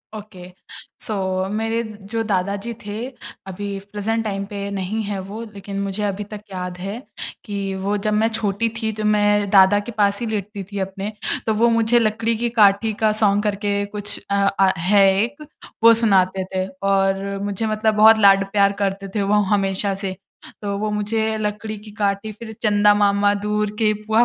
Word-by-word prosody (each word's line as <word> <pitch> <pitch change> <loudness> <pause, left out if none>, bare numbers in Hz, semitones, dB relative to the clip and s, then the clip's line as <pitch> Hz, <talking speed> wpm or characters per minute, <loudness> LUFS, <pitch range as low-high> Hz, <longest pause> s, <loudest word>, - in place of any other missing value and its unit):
Okay 190 -4 -10 0.6
so 220 - -2 0.3
अ, - - -3
मेरे 225 +2 -1 0.3
जो 225 - 0
दादा 200 -1 0
जी 235 - -3
थे 205 - -5 0.5
अभी 200 +2 -5 0.2
प्रेज़ेंट 225 +2 -1
टाइम 200 -2 -3
पे 200 -1 -5
नहीं 200 +3 -2
है 200 -1 -3
वो 220 +3 -6
लेकिन 200 0 -6
मुझे 200 +1 -3
अभी 205 0 -2
तक 210 - -7
याद 180 -1 -5
है 200 +6 -5 0.4
कि 200 -2 -3
वो 205 - +1
जब 215 - +1
मैं 215 +1 +3
छोटी 220 0 -1
थी 220 0 0
तो - - -2
मैं 205 -1 +2
दादा 195 +1 +6
के 240 +4 -7
पास 200 -1 +2
ही - - -1
लेटती 205 -2 -4
थी 200 - -4
अपने, 195 +2 -4 0.4
तो 220 - +3
वो 235 +3 +3
मुझे 230 +1 +3
लकड़ी 225 +1 0
की 235 +1 -1
काठी 215 -1 +4
का 215 - +5
सॉन्ग 205 0 +3
करके 205 0 -1
कुछ 205 0 -4
अ, - - +2
अ, 195 -1 +3
है 195 +4 +4 0.2
एक 290 +6 -5 0.4
वो 230 0 +9
सुनाते 195 -4 +2
थे। 185 0 0 0.2
और 195 0 +2 0.2
मुझे 205 +2 -2
मतलब 215 0 +1
बहुत 220 +1 +7
लाड 195 -1 +6
प्यार 200 -1 +4
करते 195 0 -2
थे 205 - +1
वो 210 +1 +3
हमेशा 195 0 0
से। 190 -1 -4 0.5
तो 200 -1 -2
वो 215 +1 -2
मुझे 220 +1 -1
लकड़ी 215 0 -3
की 210 - -10
काठी 205 0 -1
फ़िर 220 +1 -9
चंदा 205 -1 +4
मामा 205 0 +3
दूर 210 0 0
के 215 -1 +3
पुआ 220 +2 +3
205 Hz, 190 wpm, -21 LUFS, 195-215 Hz, 0.6 s, वो